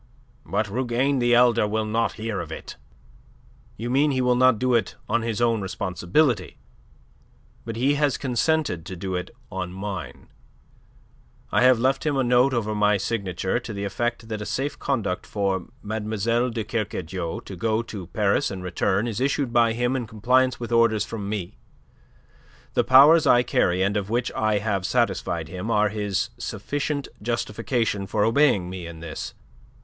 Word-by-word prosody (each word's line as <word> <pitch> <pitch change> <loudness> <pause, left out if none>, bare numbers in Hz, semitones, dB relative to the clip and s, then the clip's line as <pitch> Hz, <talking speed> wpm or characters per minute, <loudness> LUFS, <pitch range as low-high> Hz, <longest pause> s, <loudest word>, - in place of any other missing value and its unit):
"But 105 +2 0
Rougane 130 +5 0
the 120 0 +3
elder 120 -3 +4
will 110 +1 -1
not 115 +2 0
hear 110 -2 -4
of 80 -2 -6
it." - - -8 1.0
"You 120 +3 -4
mean 140 +3 +3
he 135 -2 0
will 125 0 +3
not 130 -1 +5
do 125 +2 +1
it 115 - +1
on 115 - +1
his 115 -1 -2
own 115 -2 +2
responsibility. 95 - 0 1.1
But 115 -1 -5
he 130 +5 +2
has 145 -2 +1
consented 130 - 0
to 95 - -6
do 95 +1 -4
it 90 0 -3 0.2
on 90 - -4
mine. 95 -6 -6 1.2
I - - +3
have 130 -1 +6
left 130 +3 +1
him 150 -3 0
a 135 - +2
note 125 +2 +4
over 110 -4 -1
my 105 -1 +3
signature 95 -1 -2
to 120 -2 -7
the 100 0 -4
effect 115 +3 -2
that 110 -2 -4
a - - -4
safe 140 +2 -3
conduct 105 -10 -2
for 95 -3 -1 0.2
Mlle. 110 +3 -1
de 115 -2 -3
Kercadiou 95 -6 -3
to 95 - -7
go 110 +4 0
to 100 -6 -8
Paris 100 +3 +1
and 95 -2 -6
return 95 +4 0
is 115 +1 -3
issued 135 -2 0
by 115 -1 +4
him 120 +2 0
in 125 -3 -3
compliance 125 +4 +2
with 120 -1 -6
orders 115 -3 +3
from 105 -3 -5
me. 100 -5 -5 1.1
The - - +3
powers 145 +5 +7
I 120 0 +6
carry 90 -5 +1
and 100 +2 0
of 100 -1 -2
which 120 +3 0
I 110 -1 +1
have 100 -2 -1
satisfied 95 -7 0
him 90 +5 -5
are 105 -2 +3
his 105 +2 -2
sufficient 140 +6 -3
justification 115 -2 -1
for 105 +1 +1
obeying 115 -7 +3
me 90 -2 -6
in 80 -1 -10
this. 85 -2 -6
110 Hz, 170 wpm, -24 LUFS, 100-125 Hz, 1.2 s, powers